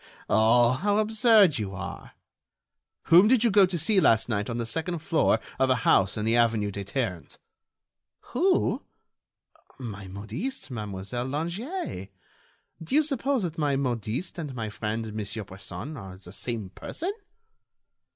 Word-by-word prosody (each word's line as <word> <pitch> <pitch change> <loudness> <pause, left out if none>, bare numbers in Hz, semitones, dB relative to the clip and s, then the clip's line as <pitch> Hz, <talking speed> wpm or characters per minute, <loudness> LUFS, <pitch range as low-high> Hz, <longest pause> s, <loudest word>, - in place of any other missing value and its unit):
Oh! 115 +2 +5
how 205 +10 +1
absurd 215 - +4
you 100 -2 -4
are!" 95 -1 -7 0.9
"Whom 175 +5 +7
did 245 -1 +4
you 235 - +4
go 195 -1 +6
to 180 -1 -2
see 190 +6 +3
last 115 -4 +3
night 105 -1 -1
on 120 - -3
the 120 - -2
second 165 +9 -2
floor 160 +1 +2 0.2
of 130 - +3
a 130 - +4
house 95 +2 +4
in 105 - -2
the 115 +1 +2
avenue 115 -3 +2
des 100 0 -5
Ternes?" 100 -5 -3 1.0
"Who? 360 +7 +2 1.0
My 105 -6 -7
modiste, 115 - -5
Mademoiselle 105 +2 -4
Langeais. 170 - -4 0.7
Do 165 - -2
you 310 - +5
suppose 275 -4 0
that 165 -2 -4
my 145 -2 +1
modiste 125 - -2
and 145 -5 -5
my 110 -3 -4
friend 110 0 -4
Monsieur 110 +1 -4
Bresson 95 - -8
are 95 -7 -9
the 90 -1 -12
same 110 -3 -4
person?" 360 +5 -5
125 Hz, 150 wpm, -27 LUFS, -, 1.0 s, Whom